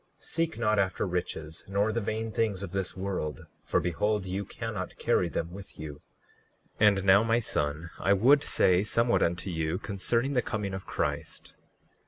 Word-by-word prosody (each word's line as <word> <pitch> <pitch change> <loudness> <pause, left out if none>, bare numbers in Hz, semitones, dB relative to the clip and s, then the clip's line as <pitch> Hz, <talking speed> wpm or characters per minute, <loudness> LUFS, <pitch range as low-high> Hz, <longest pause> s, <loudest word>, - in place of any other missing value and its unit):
39:14 - - -20
Seek 165 0 -1
not 105 -3 +2
after 95 0 0
riches 85 -4 -4
nor 100 +3 +1
the 115 +1 -1
vain 110 +2 -2
things 105 -3 0
of 95 - -6
this 95 -1 -3
world; 95 -5 -3 0.2
for - - +1
behold, 100 +4 0
you 95 +2 -2
cannot 105 -2 -5
carry 85 - +2
them 85 +1 -3
with 95 +2 -10
you. 75 -2 -7 0.8
39:15 105 - +7
And 100 -2 +3
now, 100 +1 +7
my 115 +1 +2
son, 75 -7 -1
I 100 - +3
would 130 +9 +5
say 90 -8 +3
somewhat 115 +3 +2
unto 85 +3 0
you 80 0 -1
concerning 115 +8 -1
the 125 - +3
coming 105 -4 -3
of 95 0 -6
Christ. - - -3
100 Hz, 180 wpm, -29 LUFS, 90-110 Hz, 0.8 s, 39:15